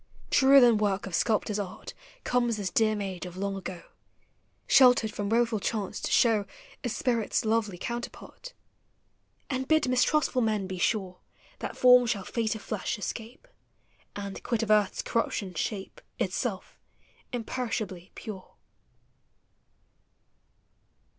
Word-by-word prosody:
Truer 275 0 +7
than 240 -4 +5
work 200 -2 0
of 190 - -8
sculptor's 210 +2 +1
art 195 -1 -6 0.3
Comes 240 -2 +1
this 195 -3 -3
dear 215 -1 +2
maid 195 -3 -4
of 180 0 -10
long 200 +1 -2
ago, 185 -2 -7 0.8
Sheltered 245 -5 +5
from 205 -1 -3
woful 230 -1 +2
chance, 205 -1 -3
to - - -2
show 220 -4 +3 0.4
A 245 - -1
spirit's 235 -2 0
lovely 215 -4 0
counterpart, 240 - -7 0.9
And 260 -1 -3
bid 315 -2 +3
mistrustful 255 +1 +2
men 215 -3 0
be 185 -1 -6
sure 185 -2 -1 0.4
That - - -5
form 250 -1 +7
shall 205 -4 -1
fate 225 0 -1
of 220 - -9
llesh 215 -1 -2
escape. 230 - -7 0.7
And, 200 -1 -6
quit 235 -2 -1
of 215 - -1
earth's 210 -2 +2
corruptions, 195 -6 -2
shape 210 - -4 0.2
Itself, - - -3 0.5
imperishably 225 -7 -4
pure. 200 -4 -9
220 Hz, 125 wpm, -28 LUFS, 200-240 Hz, 0.9 s, Truer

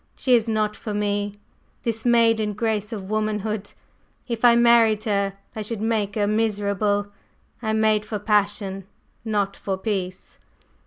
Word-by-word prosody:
"She 255 - +1
is 230 -1 +3
not 215 -1 0
for 210 -2 -5
me, 205 0 -1 0.5
this 225 -1 -2
maiden 225 -3 +3
grace 215 0 -1
of 200 -3 -6
womanhood. 215 -1 -2 0.6
If 235 -2 -4
I 240 -1 +7
married 235 -2 +5
her, 200 -2 0 0.2
I 220 - -4
should 215 +1 -4
make 215 -2 -1
her 210 -2 +1
miserable. 205 -1 0 0.5
I 220 - -3
am 220 0 +1
made 215 -1 +3
for 215 0 -4
passion, 200 -2 0 0.4
not 205 -3 -1
for 195 -1 -3
peace." 190 -3 -4
215 Hz, 150 wpm, -23 LUFS, 205-225 Hz, 0.6 s, I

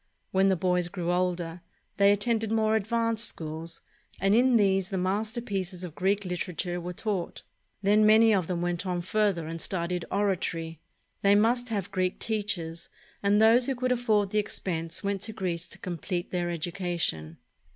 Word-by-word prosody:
When 190 +1 +3
the 190 - +3
boys 180 -1 +1
grew 175 -1 -3
older, 175 -1 -1 0.4
they 200 0 +6
attended 220 +1 +1
more 220 -1 +2
advanced 230 +1 +1
schools, 160 +1 -5 0.4
and 195 +1 +3
in 245 +1 +5
these 195 -2 +2
the 195 - -2
masterpieces 195 -1 -2
of 175 -4 -6
Greek 195 +4 0
literature 180 0 -3
were 175 +1 -5
taught. 185 -1 -3 0.4
Then 210 +2 +4
many 220 +1 +6
of 185 -5 +1
them 175 -2 -2
went 175 0 -1
on 180 -1 -1
further 195 -3 +1
and 165 +1 -5
studied 175 -1 -1
oratory. 175 -5 -1 0.4
They 200 0 +5
must 240 +4 +2
have 200 -3 -3
Greek 185 -1 0
teachers, 200 -7 -3 0.3
and 205 +1 +3
those 230 +3 +5
who 270 - 0
could 255 +1 -1
afford 215 -5 +1
the 215 - +2
expense 165 -5 -2
went 200 -1 -1
to 220 - -1
Greece 180 -4 -3
to - - -9
complete 175 0 -4
their 175 -1 -1
education. 170 - -2
190 Hz, 165 wpm, -28 LUFS, 175-215 Hz, 0.4 s, they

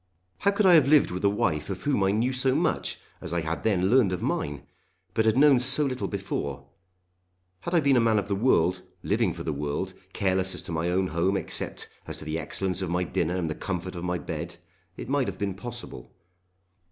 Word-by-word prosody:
How 200 - +3
could 200 +1 +1
I 185 - +7
have 155 -5 +6
lived 150 -6 +5
with 90 +2 -4
a 100 - +5
wife 80 -6 -1
of 95 - -5
whom 135 -9 +1
I 95 - +3
knew 115 +6 +1
so 130 +1 +2
much 160 +1 0 0.2
as - - -4
I 85 - +1
had 80 +1 -3
then 95 -3 +1
learned 125 -7 +5
of 90 - -2
mine, 70 -1 -2 0.5
but 110 - +1
had 110 +2 +3
known 140 -2 +6
so 140 +4 +2
little 130 -2 -2
before. 70 -9 -4 0.9
Had 170 +1 -3
I 165 - +5
been 140 -2 +4
a - - +6
man 115 -2 +3
of 100 - -1
the 100 - -1
world, 95 -5 +2 0.2
living - - +1
for - - -7
the 80 - -2
world, 70 0 -3 0.2
careless 95 -1 0
as - - -6
to - - -8
my 80 +1 -1
own 95 +1 +1
home 90 +4 +1
except - - -3 0.2
as - - -4
to - - -9
the 80 +1 -2
excellence 90 +4 -2
of 95 - -2
my 90 +1 0
dinner 85 0 -1
and 85 -3 -1
the 80 - -2
comfort 90 +1 -4
of 85 -1 -6
my 90 0 -1
bed, 85 +1 -6 0.4
it - - -7
might 140 -1 +1
have - - -4
been 100 -2 -2
possible. 105 - -8
95 Hz, 225 wpm, -27 LUFS, 85-125 Hz, 0.9 s, I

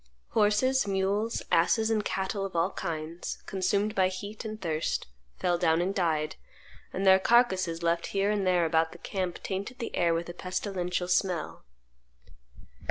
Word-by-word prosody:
Horses, 220 +4 +3
mules, 200 +3 0
asses, 220 +7 +3
and 215 -1 +1
cattle 195 +1 -2
of 195 -2 -5
all 170 +4 +2
kinds, 165 +1 -4
consumed 200 +2 0
by 190 -3 +3
heat 200 +3 -6
and 215 -1 -6
thirst, 160 -4 -1 0.3
fell 175 -1 +1
down 160 0 +3
and 185 +3 0
died; 160 -6 0 0.5
and 195 - -2
their 190 0 +7
carcasses, 190 -7 +3
left 170 0 +1
here 200 +1 +1
and 200 -3 0
there 180 -2 +3
about 160 0 +2
the - - -11
camp, 185 0 -4
tainted 200 +6 -4
the 235 - -5
air 170 -2 +2
with 170 +1 -2
a 175 - -6
pestilential 180 -1 -2
smell." 180 - -1
190 Hz, 160 wpm, -29 LUFS, 170-205 Hz, 0.5 s, their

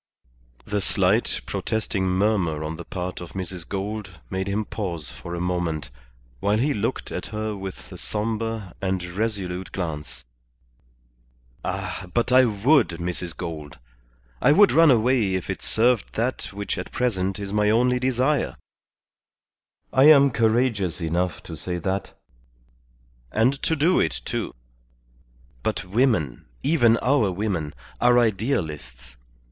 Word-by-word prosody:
The 105 -1 -1
slight, - - +2
protesting 105 -3 -1
murmur 90 -5 +1
on 80 +1 -4
the 85 - -7
part 90 +1 -5
of 85 -2 -9
Mrs. 90 -2 -5
Gould 100 -2 -4
made 95 0 -2
him 105 +2 -1
pause 85 -10 -4
for 85 0 -7
a - - -4
moment, 85 -6 -2 0.5
while 105 - +2
he 140 +6 +2
looked 105 - -2
at - - -4
her 110 0 -3
with 95 -1 -8
a - - -9
sombre 110 -2 -3
and 95 -2 -1
resolute 95 -1 -3
glance. 80 -8 -5 1.4
"Ah, 95 - -4
but 120 +1 +1
I 130 0 +7
would, 120 +5 +4
Mrs. 90 -1 -3
Gould. 80 -4 -6 0.6
I - - +5
would 200 +6 +6
run 165 0 +6
away 120 -5 +3
if 95 - -2
it - - -5
served 120 -1 +1
that 120 +3 -1
which 100 +1 -3
at - - -6
present 95 -6 0
is 100 -1 -5
my 105 0 +3
only 125 +3 +3
desire. 130 +3 +1 1.4
I 135 +1 +6
am 140 -3 +8
courageous 110 -5 +2
enough 85 +1 -1
to - - -7
say 90 -1 -2
that, 95 +3 -3 1.2
and 125 +6 +2
to 160 - +1
do 165 +5 +3
it, 70 -6 0
too. - - -3 1.1
But 95 - -2
women, 95 - +1 0.2
even 120 -7 +4
our 130 -6 +3
women, 90 -7 -2 0.2
are 120 0 +5
idealists. 85 - -1
100 Hz, 135 wpm, -24 LUFS, 90-120 Hz, 1.4 s, am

